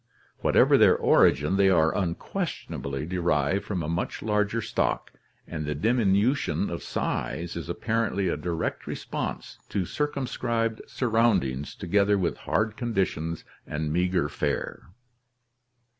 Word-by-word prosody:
Whatever - - +5
their - - +6
origin, 75 +8 +4
they 100 -1 +5
are 80 -3 +3
unquestionably 75 -5 -3
derived 90 +3 0
from 95 -5 -2
a - - -3
much 85 +2 -3
larger 105 +1 +1
stock, 110 - -1 0.4
and 80 -2 -4
the 75 0 -2
diminution 110 - +2
of 85 - -4
size 85 0 -3
is 85 0 -5
apparently 110 0 0
a 85 - +1
direct 85 +2 -3
response - - -5
to 95 -3 -1
circumscribed 120 -4 -1
surroundings 105 - +1
together 100 0 +2
with 90 -3 -1
hard 110 0 +1
conditions 95 -9 -1 0.2
and 75 0 -2
meager 90 -2 +1
fare. - - -3
95 Hz, 120 wpm, -27 LUFS, 85-110 Hz, 0.4 s, their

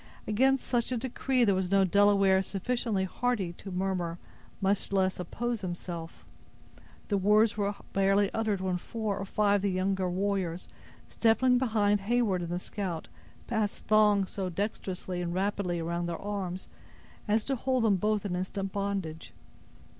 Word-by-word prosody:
Against 265 +5 +2
such 240 0 0
a 250 - 0
decree 255 +1 0
there 200 - +4
was 185 -1 0
no 195 0 +4
Delaware 195 0 +4
sufficiently 205 +1 -1
hardy 200 -2 -1
to 195 - -10
murmur, 180 -2 -2 0.4
much 200 0 0
less 190 -1 +1
oppose 235 +6 -3
himself. 175 -2 -6 0.8
The 200 -2 +2
words 210 +3 +4
were 205 -1 -1 0.2
barely 195 +1 +3
uttered 215 -4 0
when 185 -1 0
four 215 0 -3
or 195 - -3
five 205 +1 +2
of - - -3
the 200 - +1
younger 190 0 0
warriors, 185 -2 -1 0.4
stepping 245 +2 +3
behind 210 -5 +2
Heyward 205 -3 +1
and 170 - -4
the 175 - -1
scout, 180 -3 -4 0.4
passed 220 -3 -2
thongs 210 -2 +4
so 190 -2 -3
dexterously 185 -1 -3
and 175 0 -3
rapidly 190 -2 -1
around 170 +1 -2
their 170 -1 -4
arms, 195 -3 -4 0.6
as 210 +1 +2
to 270 - -1
hold 255 0 0
them 205 -4 +4
both 210 +2 0
in 185 -3 -1
instant 190 +1 -3
bondage. 195 -6 -3
200 Hz, 155 wpm, -29 LUFS, 185-215 Hz, 0.8 s, there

